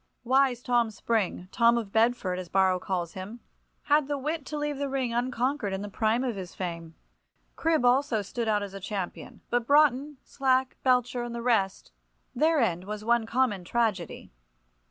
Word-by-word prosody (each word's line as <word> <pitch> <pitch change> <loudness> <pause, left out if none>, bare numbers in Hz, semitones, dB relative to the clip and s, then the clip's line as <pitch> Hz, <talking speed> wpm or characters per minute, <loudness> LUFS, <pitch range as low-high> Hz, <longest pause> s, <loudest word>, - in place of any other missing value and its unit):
Wise 255 -1 +2
Tom 240 -2 +2
Spring—Tom 225 +2 +1
of 220 -4 -4
Bedford, 220 -5 +1
as 180 -2 -7
Borrow 190 0 +3
calls 180 -3 -3
him—had 240 +8 -3
the 290 0 -1
wit 300 +1 -3
to 300 - -4
leave 295 -1 -2
the 280 -1 -2
ring 260 -3 -1
unconquered 245 -2 -1
in 195 +1 -3
the 205 - -6
prime 225 +4 +1
of 245 -4 -2
his 185 -2 -7
fame. 170 -3 -5 0.6
Cribb 320 -6 +1
also 245 -3 +3
stood 230 +4 -4
out 210 -1 +1
as 200 -1 -7
a 195 - -6
champion. 195 -2 -6
But 240 -1 0
Broughton, 290 -1 +3
Slack, 260 -1 0
Belcher, 250 -1 +2
and 240 0 -5
the 235 - -5
rest—their 195 - -1
end 180 -7 0
was 210 +1 -6
one 235 -1 +2
common 230 -6 +1
tragedy. 205 -4 -2
235 Hz, 165 wpm, -27 LUFS, 195-260 Hz, 0.6 s, Borrow